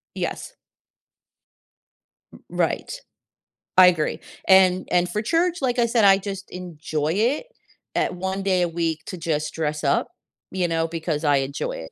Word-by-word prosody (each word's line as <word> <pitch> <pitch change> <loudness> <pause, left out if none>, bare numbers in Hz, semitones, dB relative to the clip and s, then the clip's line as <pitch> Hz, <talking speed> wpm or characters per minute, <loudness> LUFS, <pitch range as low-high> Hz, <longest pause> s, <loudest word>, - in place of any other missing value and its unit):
Yes. - - -4 1.8
R - - -13
right. - - -1 0.9
I 185 -1 +9
agree. 160 -4 +1 0.3
And 185 -1 +5
and 180 0 +2
for 210 - -2
church, 335 +8 +1
like 250 -2 0
I 235 - +4
said, 225 -3 +3
I 195 -1 +7
just 195 0 -6
enjoy 160 -3 -3
it 240 - +1 0.5
at - - 0
1 190 +2 -3
day 185 -2 +2
a - - +1
week 165 -1 -1
to 185 - -6
just 155 -2 -2
dress 150 -1 -2
up, 140 - +2 0.4
you 180 -2 0
know, 165 0 0
because 160 -2 -3
I 145 -2 +4
enjoy 140 - -3
it. - - -8
180 Hz, 155 wpm, -23 LUFS, 160-200 Hz, 1.8 s, I